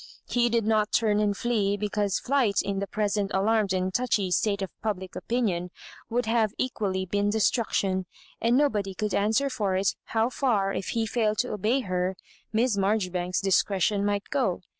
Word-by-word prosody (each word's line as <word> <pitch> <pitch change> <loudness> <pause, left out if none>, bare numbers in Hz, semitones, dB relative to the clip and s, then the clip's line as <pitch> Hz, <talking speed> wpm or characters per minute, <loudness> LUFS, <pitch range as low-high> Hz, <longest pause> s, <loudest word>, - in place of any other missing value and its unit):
He 240 -1 +2
did 230 -2 +1
not 215 -1 +2
turn 210 -2 +2
and 205 -1 +1
flee, 205 -4 0
because 205 -1 0
flight, 250 -7 +1
in 195 -1 -2
the 200 - -3
present 205 -1 -1
alarmed 210 0 +2
and 185 0 0
touchy 210 -6 0
state 200 +2 +1
of 190 - -5
public 190 -4 -3
opinion, 195 -8 -1 0.4
would 245 +2 0
have 225 -1 +1
equally 195 -7 -1
been 205 +2 0
de 220 +1 0
struction; 195 -5 +1 0.3
and 235 +2 +3
nobody 210 -10 +1
could 210 0 -2
answer 220 +8 +2
for 205 -8 -1
it 190 +1 +1
how 225 +2 0
far, 210 -8 +1
if 195 - -3
he 225 - +1
failed 215 -1 0
to 250 - -1
obejj 230 +6 0
her. 185 0 -1 0.4
Miss 225 +1 +2
Marjoribanks's 185 -3 0
discretion 195 +1 +2
might 205 0 -1
go. 250 -11 0
205 Hz, 175 wpm, -27 LUFS, 195-225 Hz, 0.4 s, and